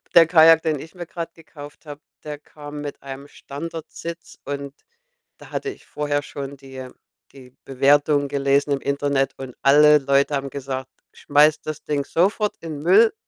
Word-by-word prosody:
der 165 -2 +8
Kajak, 165 -1 +7
den 155 -3 0
ich 160 +6 -11
mir 175 -1 -6
grad 170 -1 -6
gekauft 150 -2 -13
habe, 145 0 -9 0.2
der 150 -1 -6
kam 145 -1 -10
mit 145 -1 -7
einem 135 +1 -8
Standardsitz 165 +3 -8
und 140 0 -5 0.6
da - - -15
hatte 415 - -3
ich 395 - -11
vorher 145 -1 -2
schon 140 -1 -7
die, 135 -1 -14
äh 130 -1 -8 0.4
die 130 -2 -15
Bewertungen 145 +2 +3
gelesen 140 +1 +1
im 140 -1 0
Internet 140 -1 0
und 130 -2 -8
alle 150 +2 +6
Leute 140 +1 +2
haben 135 0 -3
gesagt: 130 -1 -5 0.2
„Schmeiß 150 +1 +3
das 155 -1 -6
Ding 145 -2 -1
sofort 205 +7 +1
in 160 -3 -6
Müll 190 +9 +5
145 Hz, 165 wpm, -22 LUFS, 140-160 Hz, 0.6 s, der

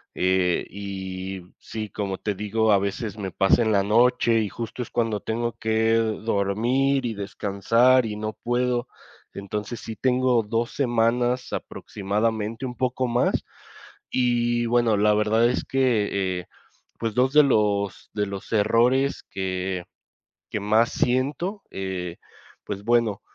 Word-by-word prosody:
Eh, 90 -1 +1
y 95 -1 -6 0.2
sí, 110 -1 -6
como 100 -2 -3
te 105 -2 -2
digo, 110 +2 +1
a 100 - +6
veces 105 +2 -3
me 95 -3 -4
pasa 95 +7 +3
en 110 - +1
la 100 - +3
noche, 115 +2 +3
y 105 - -2
justo 115 +2 -6
es - - -11
cuando 115 -3 0
tengo 115 +1 -2
que 110 0 +1
dormir, 115 +5 +1
y 115 - -1
descansar, 115 +6 +2
y 105 -1 -4
no 110 0 -3
puedo. 120 +2 -1 0.5
Entonces 105 +3 -5
sí 110 - -6
tengo 125 -2 +2
2 115 +2 -1
semanas 120 0 +1
aproximadamente 110 +4 -2
un 125 - -5
poco 130 0 0
más. 120 +1 +1 0.7
Y 120 -1 +1
bueno, 120 -2 +3
la 105 +1 +4
verdad 110 +3 +3
es 125 - -1
que, 105 -8 +1
eh, - - -17 0.5
pues 115 -2 -2
2 130 +2 +2
de 150 0 +8
los 105 -6 +1
de 105 -1 0
los 100 -1 -7
errores 120 +6 +2
que 95 -1 -3 0.7
que 105 - -2
más 110 +3 +3
siento, 145 - -1
eh, 90 -3 -4 0.5
pues 100 0 -5
bueno, 115 -3 +2
110 Hz, 140 wpm, -24 LUFS, 100-120 Hz, 0.7 s, de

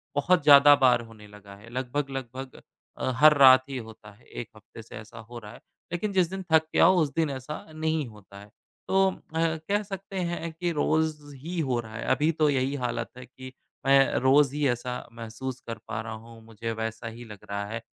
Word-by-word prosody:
बहुत 170 +4 +2
ज़्यादा 145 0 +8
बार 130 -3 +4
होने 110 -2 -14
लगा 100 -1 -14
है, 105 +3 -15
लगभग-लगभग 130 0 -5 0.4
अ, 130 - -1
हर 150 +2 +6
रात 130 -1 +8
ही 135 - -4
होता 110 -3 -10
है। 110 - -24
1 120 - -8
हफ्ते 110 +1 -13
से 110 - -13
ऐसा 110 +1 -11
हो 120 -1 -8
रहा 105 -1 -11
है - - -13 0.3
लेकिन 200 +4 -2
जिस 180 -3 +2
दिन 190 0 -6
थक 160 0 +4
के - - 0
आऊँ, 185 0 +6
उस 145 -2 -1
दिन 160 -3 +1
ऐसा 135 +3 -6
नहीं 155 -1 -1
होता 100 -2 -14
है। 100 - -13 0.4
तो 190 0 +3
अ, - - -10 0.2
कह 165 +6 0
सकते 195 -1 -7
हैं 170 -1 -4
कि 175 +1 -2
रोज़ 150 -2 -1
ही 165 +6 -6
हो 130 -6 0
रहा 110 -1 -8
है - - -5
अभी 150 +5 +1
तो 155 -1 +2
यही 135 0 0
हालत 115 -1 -3
है 125 - -9
कि 130 +1 -12 0.3
मैं 135 0 +4
रोज़ 135 +1 +4
ही 150 -2 +1
ऐसा 125 +1 -2 0.2
महसूस 120 +3 -7
कर 115 -1 -5
पा 110 0 -4
रहा 110 0 -7
हूँ। 115 +1 -12
मुझे 115 0 -6
वैसा 115 +1 -5
ही 115 +2 -9
लग 105 -3 -11
रहा 100 0 -3
है 115 +2 -6
130 Hz, 215 wpm, -26 LUFS, 115-155 Hz, 0.4 s, ज़्यादा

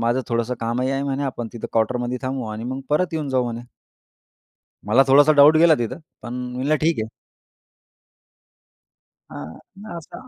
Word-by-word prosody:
माझं 120 +3 +1
थोडंसं 115 +1 -1
कामही 120 +3 -1
आहे 135 0 -1
म्हणे 140 0 -2
आपण 120 -3 -4
तिथं 120 - -6
क्वार्टरमध्ये 125 +2 0
थांबू 130 -2 -3
आणि 110 +2 -6
मग 130 +2 -4
परत 175 +3 +1
येऊन 150 -3 -2
जाऊ 130 -1 +1
म्हणे. 120 -1 -4 1.3
मला 125 +6 +5
थोडासा 145 +3 +6
डाउट 150 +2 +8
गेला 165 0 +6
तिथं. 120 +7 -3 0.2
पण 120 - -7 0.2
म्हणलं 135 +5 0
ठीक 160 -5 +1
आहे. 110 - -5 2.2
हां. 80 - -9 0.2
मग 215 -4 -8
असा 210 +10 -11
130 Hz, 160 wpm, -22 LUFS, 120-145 Hz, 2.2 s, डाउट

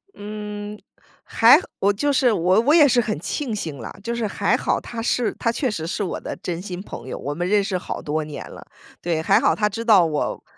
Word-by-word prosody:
嗯。 210 0 -7 0.5
还 - - +6 0.2
我 200 - +3
就 285 +8 0
是 255 -2 +3
我 185 +1 +3
我 280 +6 +3
也 300 -4 +7
是 245 -2 +3
很 215 -9 -3
庆 235 - -3
幸 160 -9 -5
啦， 115 - -7
就 235 +2 -3
是 235 -2 -1
还 - - +1
好 - - 0
她 235 -1 -7
是 240 0 0
她 230 - +1
确 245 +1 -1
实 160 -5 -4
是 205 - -2
我 185 - -3
的 - - -6
真 175 -1 -5
心 180 -2 -6
朋 130 - -9
友， - - -5
我 145 - -4
们 175 +4 -2
认 205 0 +3
识 190 -2 -2
好 - - -5
多 155 +1 -2
年 150 -1 -8
了。 - - -11 0.4
对， 165 -2 -1
还 195 - +4
好 - - +2
她 210 - +1
知 220 +3 -4
道 210 -7 +6
我 150 -2 -2
205 Hz, 250 characters per minute, -22 LUFS, 170-230 Hz, 0.5 s, 也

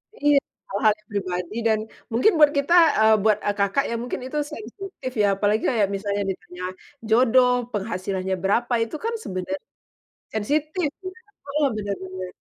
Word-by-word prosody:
Iya, 290 0 +3 0.3
hal-hal 210 +2 +3
yang 215 - -32
pribadi 180 0 -3
dan 220 -1 +3 0.3
mungkin 245 - +4
buat 295 -1 +7
kita 280 +5 +2 0.3
eee, 220 0 +6
buat, 215 -2 +4
eee, 205 0 +1
Kakak 200 +8 +2
ya, 235 - -1
mungkin 245 - -4
itu 300 - -4
sensitif 260 - -7
ya? - - +4
Apalagi 210 +2 +1
kayak 215 -4 +2
misalnya 200 0 -2
ditanya 180 -1 -9 0.5
jodoh, 250 +2 +5 0.2
penghasilannya 190 -2 -2
berapa, 240 +5 +1
itu 230 +7 -6
kan 460 - 0
sebenarnya 185 +1 -4 0.8
sensitif 305 - 0 0.2
iya, 370 +5 -7 0.3
heeh, 290 +1 +1
bener 205 -2 -3
bener. 185 -1 -7
220 Hz, 155 wpm, -24 LUFS, 195-275 Hz, 0.8 s, buat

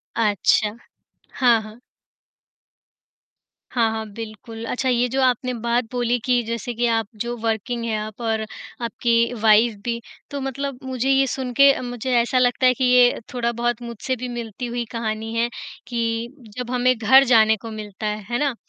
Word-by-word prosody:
अच्छा। 210 0 +2 0.6
हाँ, 240 -3 +5
हाँ। 215 +2 -12 1.9
हाँ, 230 -3 +2
हाँ, 220 0 -3
बिल्कुल। 225 +1 -8
अच्छा 260 +1 -1
ये 245 0 +2
जो 270 +2 0
आपने 255 0 +1
बात 235 +1 0
बोली 245 -1 +1
कि 245 -1 +3
जैसे 235 +2 -4
कि 240 +1 0
आप 225 -2 +1
जो 240 0 -2
वर्किंग 225 +1 -2
हैं 220 -2 -1
आप 215 +2 -7
और 225 -1 0 0.4
आपकी 235 +1 +1
वाइफ़ 220 +1 +5
भी, 235 -1 -1 0.3
तो 280 - -4
मतलब 270 0 -4
मुझे 260 0 -2
ये 270 0 +4
सुन 255 -1 -3
के 275 +2 +7
अ, - - -5
मुझे 245 +1 -4
ऐसा 240 +2 +1
लगता 250 +1 +2
है 255 - +5
कि 260 - -3
ये 250 -1 +5
थोड़ा-बहुत 240 -1 -1
मुझसे 235 +2 -4
भी 250 +1 -5
मिलती 240 0 -5
हुई 240 0 -3
कहानी 225 -1 -3
है, 235 +1 +1 0.4
कि 230 -1 -1 0.3
जब 250 -1 -4
हमें 250 0 +3
घर 260 +5 +6
जाने 220 -3 +5
को 225 +2 -9
मिलता 215 0 -6
है, 210 0 -3
है 240 - 0
ना? 280 -4 0
235 Hz, 175 wpm, -22 LUFS, 225-250 Hz, 1.9 s, के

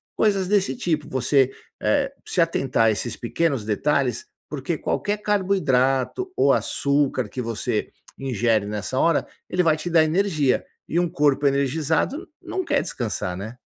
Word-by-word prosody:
coisas 200 -3 +2
desse 200 0 +2
tipo. 160 - -1
Você, 130 -1 +2 0.3
eh, 280 -1 +1
se - - -2
atentar 135 -8 +2
a - - +5
esses 115 +3 -3
pequenos 135 0 -1
detalhes 125 +2 0 0.2
porque 150 +3 -3
qualquer 205 +6 -1
carboidrato 185 - +1
ou 140 - +4
açúcar 140 -4 +1
que 125 - -4
você 115 -2 -2 0.3
ingere 115 -5 +1
nessa 105 +5 -3
hora 165 0 +3 0.2
ele 180 0 +1
vai 160 -2 +3
te 155 +3 -4
dar 165 -2 +5
energia 155 -4 +1 0.2
e 170 - +1
um 175 - +1
corpo 145 -2 +2
energizado 150 - 0
não 380 0 -3
quer 290 -3 +2
descansar, 105 -6 -3
né? 110 +5 -7
145 Hz, 150 wpm, -23 LUFS, 125-180 Hz, 0.3 s, a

